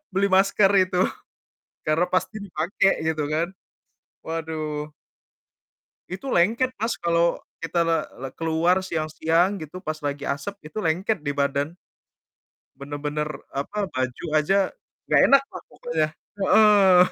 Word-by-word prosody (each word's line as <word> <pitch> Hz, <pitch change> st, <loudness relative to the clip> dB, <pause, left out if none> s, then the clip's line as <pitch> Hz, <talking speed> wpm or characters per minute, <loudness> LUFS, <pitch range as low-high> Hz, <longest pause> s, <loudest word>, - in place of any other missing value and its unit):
beli 200 Hz, +1 st, +2 dB
masker 195 Hz, +1 st, +4 dB
itu, 180 Hz, -1 st, -1 dB, 0.9 s
karena 160 Hz, +3 st, +3 dB
pasti 185 Hz, +4 st, 0 dB
dipakai, 195 Hz, +1 st, +1 dB, 0.2 s
gitu 155 Hz, -2 st, 0 dB
kan. 160 Hz, +2 st, +1 dB, 0.8 s
Waduh. 155 Hz, -2 st, -4 dB, 1.2 s
Itu 190 Hz, +9 st, -6 dB
lengket 230 Hz, +7 st, +3 dB
Mas, 225 Hz, +2 st, -1 dB
kalau 170 Hz, 0 st, +2 dB, 0.2 s
kita 165 Hz, +1 st, 0 dB
le 165 Hz, -2 st, +1 dB, 0.2 s
le 135 Hz, -, -4 dB
keluar 170 Hz, +3 st, +1 dB
siang-siang 165 Hz, +3 st, +1 dB
gitu, 160 Hz, +1 st, -8 dB
pas 155 Hz, -4 st, -4 dB
lagi 145 Hz, 0 st, -3 dB
asap, 145 Hz, +9 st, -4 dB
itu 215 Hz, -, -7 dB
lengket 175 Hz, +2 st, 0 dB
di 145 Hz, -, 0 dB
badan. 140 Hz, +3 st, -1 dB, 1.0 s
Benar-benar, 145 Hz, +1 st, -3 dB, 0.3 s
apa, 200 Hz, +9 st, -2 dB
baju 130 Hz, +2 st, -2 dB
aja, 155 Hz, +5 st, +3 dB, 0.5 s
nggak -, -, +4 dB
enak 275 Hz, 0 st, +7 dB
lah -, -, -10 dB
pokoknya. 160 Hz, -1 st, -1 dB, 0.4 s
Heeh. 200 Hz, -3 st, +6 dB
165 Hz, 125 wpm, -24 LUFS, 150-190 Hz, 1.2 s, enak